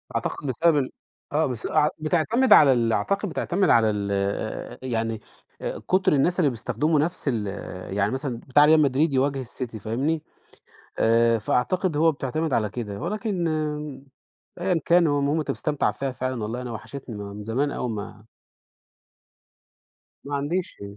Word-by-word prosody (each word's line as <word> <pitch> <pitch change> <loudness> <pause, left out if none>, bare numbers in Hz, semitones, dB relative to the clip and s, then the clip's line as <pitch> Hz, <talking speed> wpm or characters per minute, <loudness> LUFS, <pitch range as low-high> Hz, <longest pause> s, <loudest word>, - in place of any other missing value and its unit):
أعتقد 145 - -3
بسبب 155 +5 +3
ال 130 -3 0 0.4
آه، 155 +2 +2
بس 125 -4 -4
أع 150 -1 +3
بتعتمد 195 +11 +3
على 140 -3 +8
ال 115 -2 +1
أعتقد 200 - 0
بتعتمد 180 +2 0
على 110 -2 +5
ال 100 -1 -2
آآ 100 0 -3
يعني 115 -3 -2 0.4
آآ - - -4
كُتر 185 -1 +3
الناس 170 +6 +2
اللي 155 -5 +4
بيستخدموا 145 +6 0
نَفْس 165 +5 -1
ال 110 -6 0 0.5
يعني 100 +1 +2
مثلًا 130 -2 -3
بتاع 145 +3 +6
Real 160 +1 +6
Madrid 145 +1 +2
يواجه 135 0 +1
الCity 120 -1 -6
فاهمني، 135 +10 -1 0.8
آآ 115 0 +4
فأعتقد 150 - 0
هو 165 +1 +5
بتعتمد 155 +2 -2
على 110 -3 +1
كده 105 -3 -5
ولكن 200 -5 -2 1.1
أيًا 180 -2 +1
كان 170 0 +5
هو 145 -1 +2
المهم 145 +3 +1
أنت 155 - -1
مستمتع 150 -2 0
فيها 135 -1 -3
فعلًا، 130 -2 -3
والله 115 +4 -3
أنا 125 -1 -5
وحشتني، 120 +2 -8
ما 100 -1 -7
من 105 - -8
زمان 130 +7 0
أوي 125 - -3
ما 105 -1 -7 2.0
ما 145 +1 -4
عنديش. 160 - -3
140 Hz, 155 wpm, -25 LUFS, 115-160 Hz, 2.0 s, على